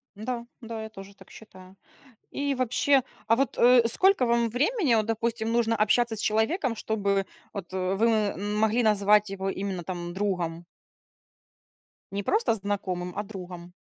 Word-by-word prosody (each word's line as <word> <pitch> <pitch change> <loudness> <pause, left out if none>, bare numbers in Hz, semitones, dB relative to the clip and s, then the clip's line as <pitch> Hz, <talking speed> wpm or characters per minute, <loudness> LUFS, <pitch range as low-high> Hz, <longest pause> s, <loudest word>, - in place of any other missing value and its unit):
Да, 235 +3 -4 0.2
да, 225 -1 -6
я 220 - -7
тоже 200 -2 -12
так 190 -1 -17
считаю. 185 -3 -14 0.6
И 280 0 -1
вообще, 260 +2 +2 0.2
а 230 +1 +4
вот, 275 +2 0
э, 245 0 +6
сколько 375 - +3
вам 235 0 +2
времени, 295 - +1
вот 215 -1 +2
допустим, 225 0 -1
нужно 230 -1 +2
общаться 225 +2 +2
с - - -6
человеком, 230 - +1
чтобы 200 -3 0 0.3
вот, 190 -3 -7
э, 185 0 -1
вы 215 -1 +1 0.2
могли 220 +3 +2
назвать 210 -1 +3
его 195 0 -3
именно 190 -2 -4
там 175 -1 -5
другом? 180 -4 -2 1.5
Не 200 +1 -3
просто 425 - +2
знакомым, 190 -4 -3
а 205 - -1
другом. 180 -4 -9
215 Hz, 150 wpm, -27 LUFS, 195-235 Hz, 1.5 s, э